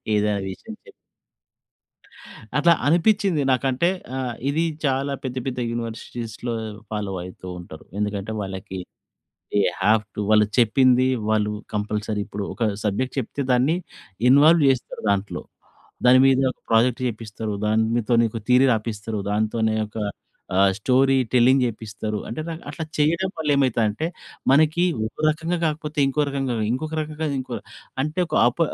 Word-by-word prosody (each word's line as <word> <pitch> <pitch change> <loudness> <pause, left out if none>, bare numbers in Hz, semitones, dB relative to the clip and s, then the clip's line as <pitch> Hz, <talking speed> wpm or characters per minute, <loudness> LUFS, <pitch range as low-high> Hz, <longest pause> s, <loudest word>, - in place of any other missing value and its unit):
ఏదైనా 105 -1 +1
విషయం 95 - -8
చెప్తే - - -14 1.7
అట్లా 170 +3 +5
అనిపించింది. 185 0 +3
నాకంటే 130 +5 +1 0.3
ఆహ్, 125 -3 -3
ఇది 155 +3 +1 0.2
చాలా 135 +1 0
పెద్ద, 130 -1 -4
పెద్ద 125 -1 -3
యూనివర్సిటీస్‌లో 115 0 -5 0.4
ఫాలో 105 -2 -3
అయితూ 90 0 -10
ఉంటారు. 80 -3 -11 0.2
ఎందుకంటే, 105 0 -2
వాళ్ళకి 95 -1 -6 0.7
దె 105 - +3 0.2
హావ్ 105 +2 +4
టు - - -2
వాళ్ళు 105 0 +5
చెప్పింది 130 +2 +4 0.2
వాళ్ళు 105 -1 +2 0.2
కంపల్సరీ 105 0 -2
ఇప్పుడు 100 0 -5
ఒక 120 - -3 0.2
సబ్జెక్ట్ 110 +5 -1
చెప్తే 135 +3 -4
దాన్ని 130 +6 +3 0.5
ఇన్వాల్వ్ 150 +5 +6
చేస్తారు 130 -2 -2
దాంట్లో. 100 0 -1 0.6
దాని 125 +1 +7
మీద 135 -1 +4
ఒక - - -20
ప్రాజెక్ట్ 115 +2 +3
చేపిస్తారు. 110 -1 -5
దానితో 110 +2 +1
నీకు 115 0 -1
థియరీ 125 +1 +5
రాపిస్తారు. 110 -1 -4
దాంతోనే 110 +1 0
ఒక 110 - -11 0.6
ఆహ్, 95 +1 +5
స్టోరీ 135 +4 +3 0.2
టెల్లింగ్ 130 +2 +5
చేపిస్తారు. 110 -2 -4
అంటే, 115 - -5
న - - -3 0.2
అట్లా 155 +2 -5
చేయడం 170 +5 +2
వల్ల 155 -2 -2
ఏమైతదంటే, 125 0 +1 0.4
మనకి 155 +4 +4 0.2
ఒక 110 - -8
రకంగా 165 +3 -1
కాకపోతే 150 -1 -2
ఇంకో 145 +2 +1
రకంగా, 135 -3 -2 0.2
ఇంకొక 155 +6 -3
రకంగా 155 +1 -4
ఇంకో 125 -2 -5 0.5
అంటే, 155 +4 -3
ఒక - - -3
అప 125 - -14
125 Hz, 135 wpm, -23 LUFS, 105-140 Hz, 1.7 s, దాని